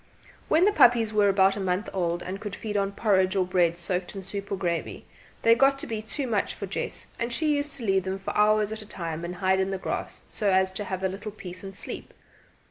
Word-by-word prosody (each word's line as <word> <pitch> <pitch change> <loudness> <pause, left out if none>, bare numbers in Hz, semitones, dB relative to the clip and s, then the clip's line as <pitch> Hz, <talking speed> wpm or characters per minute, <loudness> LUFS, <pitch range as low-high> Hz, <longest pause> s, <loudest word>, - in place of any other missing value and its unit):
When 330 +4 +4
the 415 - +5
puppies 235 - +5
were 205 -1 +4
about 195 0 +4
a - - -4
month 190 +2 -1
old, 175 -2 -1
and 190 +2 -5
could 205 -2 -5
feed 210 -2 -5
on 200 -1 0
porridge 190 -3 +2
or 190 -2 +2
bread 175 -2 +2
soaked 180 +2 -3
in 195 - -6
soup 200 +1 -5
or - - +1
gravy, 175 -3 -3 0.4
they 230 - +7
got 275 +3 +4
to - - -5
be 220 -2 -3
too 245 +6 -3
much 220 -5 0
for - - -5
Jess, - - -4
and 235 +1 -1
she 300 +4 +1
used 285 0 -2
to 240 - -6
leave 195 -2 +2
them 190 0 -2
for 195 - -5
hours 210 0 +3
at 220 0 -4
a 210 - -11
time 165 -4 -5
and 175 +1 -4
hide 190 +1 +2
in 190 0 +1
the 195 - -2
grass - - -4
so 210 -3 -1
as 190 0 +3
to 205 +2 -5
have 190 -1 -4
a - - +3
little 200 +3 -6
peace 185 -3 -8
and 195 0 -8
sleep. - - -7
195 Hz, 250 wpm, -27 LUFS, 185-215 Hz, 0.4 s, they